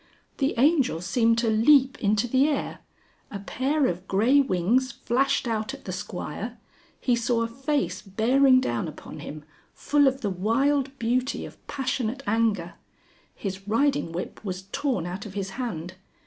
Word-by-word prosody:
The 275 0 +1
Angel 275 - +3
seemed 230 +5 +2
to 230 0 +1
leap 260 +4 +4
into 210 +2 +1
the 265 +4 +3
air, 290 -3 -2 0.5
a 205 - -5
pair 265 +8 0
of 180 -3 -2
grey 230 +9 +4
wings 255 +2 +2
flashed 265 +1 0
out 225 +3 -2
at 275 - -16
the 185 - -4
Squire, 200 +3 -5 0.4
he 245 - +2
saw 235 0 +1
a - - -1
face 250 - -2
bearing 255 +7 +4
down 120 - -1
upon - - -9
him, 150 0 -8 0.3
full 290 -1 +3
of 265 +1 0
the 205 - -1
wild 270 +8 +1
beauty 250 +3 -1
of - - -13
passionate 265 -2 -2
anger. 205 -5 0 0.6
His 195 0 -6
riding 275 - +1
whip 175 +5 -6
was 185 -2 -4
torn 250 - -1
out 185 +4 -5
of 195 - -11
his 195 -1 -3
hand. 185 -7 -5
230 Hz, 160 wpm, -26 LUFS, 195-270 Hz, 0.6 s, leap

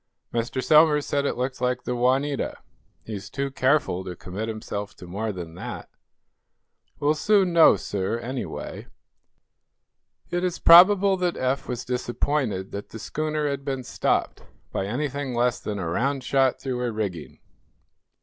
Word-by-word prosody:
"Mr. 120 +2 -2
Somers 150 +1 +5
said 140 0 0
it - - -2
looked 125 +1 -3
like 125 0 0
the 125 - -2
'Juanita.' 135 +4 0 0.5
He's 105 -3 -6
too 140 0 -3
careful 130 -8 +1
to 90 -1 -6
commit 95 +6 -6
himself 105 -2 -5
to - - -12
more 105 +5 -3
than 85 -4 -7
that." 90 - -7 1.1
"We 145 - -5
shall - - +5
soon 190 +2 +2
know, 165 -1 +7
sir, 100 +3 -2
anyway." 125 +2 -6 1.4
It 175 0 -1
is 180 -2 -1
probable 190 +3 +7
that 180 -1 -1
Eph 130 +1 -1
was 125 -1 -4
disappointed 120 -4 -1
that 100 +1 -6
the - - -8
schooner 155 +5 -2
had 140 -1 -3
been 135 -2 -3
stopped - - -1 0.3
by 95 - -2
anything 140 +2 -3
less 120 0 +1
than 105 -1 -4
a 95 -4 -3
round 135 +10 -1
shot 135 -1 +2
through 130 -2 -3
her 125 -1 -1
rigging. 100 -7 -4
130 Hz, 155 wpm, -25 LUFS, 110-145 Hz, 1.4 s, know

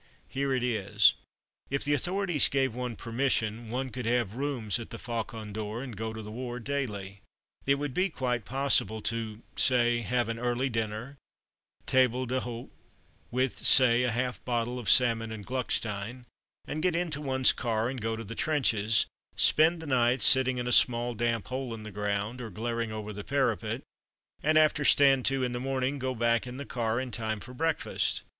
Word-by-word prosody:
Here 140 0 -1
it 130 -2 0
is: 105 -4 +3 0.6
If 140 +1 -1
the 145 - +1
authorities 175 +2 +1
gave 135 -3 +1
one 125 -1 -4
permission, 115 -1 -1
one 130 +2 -3
could 125 -2 -5
have 120 -4 +1
rooms 125 -6 -2
at 115 - -8
the 115 - -7
Faucon 115 -2 -5
d'Or 110 +3 -4
and 125 -5 -7
go 110 +2 -4
to 110 0 -7
the 105 - -8
war 120 +1 -5
daily. 105 -7 -4 0.5
It 140 - +5
would 145 -1 -4
be 185 +6 +1
quite 125 -7 -2
possible 130 -4 +1
to, 115 -1 -3
say, 120 -2 +4
have 120 +2 0
an 115 0 -4
early 125 +2 0
dinner, 110 +4 -3 0.7
table 130 -1 +2
d'hote 125 -1 -4 0.6
(with, 130 +2 -1
say, 125 -2 +6
a 125 - +1
half 125 +2 -2
bottle 120 0 -1
of 120 - -3
Salmon 115 -3 +4
and 105 -2 -7
Gluckstein), 120 -2 -3 0.5
get 175 +1 +1
into 165 -4 -2
one's 130 -2 +3
car 115 -2 -1
and 130 -1 -4
go 115 +1 -1
to 115 - -6
the 115 +1 -7
trenches, 115 -7 +1 0.3
spend 160 +2 +4
the - - -7
night 125 -2 +2
sitting 130 -1 +5
in 125 0 -3
a - - -1
small 120 0 +4
damp 115 -1 -1
hole 130 -2 -4
in 110 - -10
the 110 - -8
ground, 105 +4 -2
or 115 - -6
glaring 115 +3 -3
over 105 -1 -5
the 105 0 -7
parapet, - - -1 0.6
and 155 +1 +3
after 155 -1 +4
"stand 135 -3 +5
to" 135 -1 +1
in 125 - -1
the 120 - -3
morning, 135 +1 -1
go 130 0 -2
back 115 +1 +1
in 125 +1 -7
the 140 - -6
car 115 -2 -1
in 130 -1 -4
time 110 -2 -3
for 125 +6 -11
breakfast. 160 +4 -1
120 Hz, 185 wpm, -29 LUFS, 110-130 Hz, 0.7 s, say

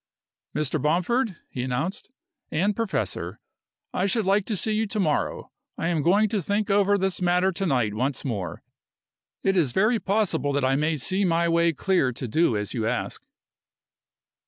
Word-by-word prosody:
"Mr. 150 0 0
Bomford," 185 - +1
he 125 - -5
announced, 130 +10 -3 0.4
"and 195 +6 +1
professor, 225 -3 -2 0.5
I 185 - +1
should 215 +1 0
like 195 +1 +2
to 220 - -2
see 215 +3 0
you 215 +1 +1
to 210 +1 -3
morrow. 155 -6 -1 0.3
I 165 - -1
am 165 -3 +1
going 200 +8 +4
to 205 -1 0
think 205 +4 -1
over 200 0 +4
this 190 -1 -1
matter 180 +1 +3
to 195 +2 -3
night 125 -8 +1
once 130 +7 -2
more. 100 -10 -4 0.8
It 195 0 +2
is 150 -9 +2
very 220 +4 +3
possible 190 -9 0
that 140 -1 +1
I 135 +1 +2
may 155 +3 +1
see 185 +8 0
my 170 -2 +2
way 170 0 +3
clear 165 -4 +1
to 125 +1 -5
do 120 -1 +2
as 105 0 -3
you 115 -4 -1
ask." 125 +1 -2
175 Hz, 175 wpm, -25 LUFS, 140-200 Hz, 0.8 s, going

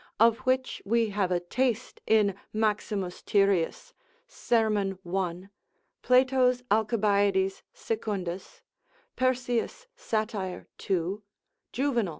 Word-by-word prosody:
of 230 +1 +5
which 255 0 0
we 230 +2 +1
have 195 -2 0
a 180 - +2
taste 240 +6 -2
in 210 -3 +4 0.2
Maximus 210 -3 -1
Tyrius, 195 -4 +1 0.3
serm. 210 -4 0
1. 180 +1 -3 0.5
Plato's 255 -1 +3
Alcibiades 205 -3 +2
Secundus, 195 -5 -4 0.5
Persius 255 - -1
Sat. 220 - -2 0.5
2. 190 +2 -1 0.5
Juvenal. 245 -7 0
215 Hz, 90 wpm, -28 LUFS, 195-240 Hz, 0.5 s, of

